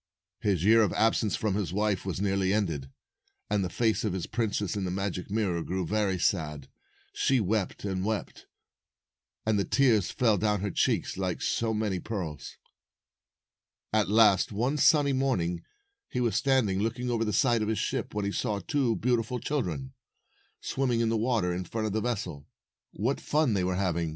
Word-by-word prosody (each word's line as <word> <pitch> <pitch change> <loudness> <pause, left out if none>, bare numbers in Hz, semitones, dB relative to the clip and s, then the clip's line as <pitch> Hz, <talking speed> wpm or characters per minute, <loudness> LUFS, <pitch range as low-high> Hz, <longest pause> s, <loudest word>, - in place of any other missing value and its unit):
His 95 -5 0
year 115 +2 +6
of 105 - +2
absence 110 -1 +2
from 110 -3 -1
his 95 -5 -2
wife 100 -1 0
was 95 - -2
nearly 95 -1 +1
ended, 85 -10 -1 0.6
and 105 -2 +2
the 90 - -2
face 110 +2 +1
of 105 -4 -1
the 95 -2 -3
princess 110 -3 -1
in 100 - -2
the 90 - -2
magic 95 0 -3
mirror 100 -5 0
grew 90 +2 -2
very 100 0 0
sad. 75 -6 -1 0.4
She 135 -1 +2
wept 105 -1 -1
and 95 -2 -2
wept, 110 0 -4 1.0
and 110 -2 +2
the - - +2
tears 115 -8 +3
fell 110 -5 +2
down 105 -2 +1
her 100 -1 -2
cheeks - - 0
like 95 -2 -2
so 115 -1 0
many 105 -4 -1
pearls. 90 -9 -5 1.4
At 110 -2 +2
last, 105 -3 +5
one 125 +8 0
sunny 145 -1 +4
morning, 90 -11 0 0.5
he 125 - -3
was 120 -5 +1
standing 125 -9 +2
256 - - 0 0.2
looking 125 0 -2
over 115 -1 +1
the 105 - -1
side 120 -2 +2
of 105 - -1
the 110 - 0
ship, 105 - -3
when 105 -1 -1
he 100 - -1
saw 105 +1 -1
two 120 +3 0
beautiful 120 0 0
children, 135 -1 -3 0.7
swimming 125 -3 0
in 115 - +1
the 115 - +1
water 110 -6 +1
in 90 +1 -3
front 110 +5 -3
of 105 - -2
the 110 - 0
vessel. 95 -12 -3 0.4
What 125 +8 -2
fun 150 -5 +1
they 95 -3 +1
were 90 0 0
hav 90 -3 0
ing! 85 -1 -1
105 Hz, 185 wpm, -28 LUFS, 95-115 Hz, 1.4 s, year